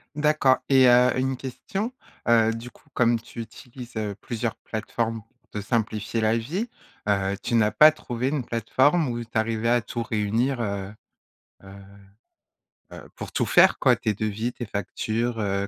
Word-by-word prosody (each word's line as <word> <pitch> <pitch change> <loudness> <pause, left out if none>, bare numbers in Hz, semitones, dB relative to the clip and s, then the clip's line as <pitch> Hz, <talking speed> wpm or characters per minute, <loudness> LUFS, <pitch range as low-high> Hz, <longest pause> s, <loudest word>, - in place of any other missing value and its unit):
D'accord 150 -3 +3
et 130 -2 +6
heu, 125 +1 +6
une 130 0 0
question, 190 - -4 0.4
heu, 115 -1 +4
du 115 +2 -8
coup - - -24
comme 120 -1 +3
tu 115 +1 -9
utilises, 120 +1 -10
heu, 105 -2 -3
plusieurs 115 +2 -4
plateformes 115 +1 -3
pour 110 - -34
te 105 - -5
simplifier 110 0 -1
la 110 +1 +2
vie, 175 - -3 0.4
heu, 100 -1 +1
tu 120 - -1
n'as 110 -2 +3
pas 155 +1 +7
trouvé 125 -4 -3
une 140 -4 -2
plateforme 130 +8 +2
où 120 0 -3
tu 115 - -5
arrivais 110 0 0
à 120 0 +3
tout 115 +1 -4
réunir, 115 +4 0
heu 100 -2 -3 0.7
heu 95 - -12 1.2
heu, - - -11
pour - - -7
tout - - +1
faire - - +5
quoi - - +4
tes 110 - -1
devis, 110 +3 -2
tes 120 - -6
factures, 115 +3 -2
heu, 100 -1 -1
115 Hz, 170 wpm, -25 LUFS, 110-125 Hz, 1.2 s, pas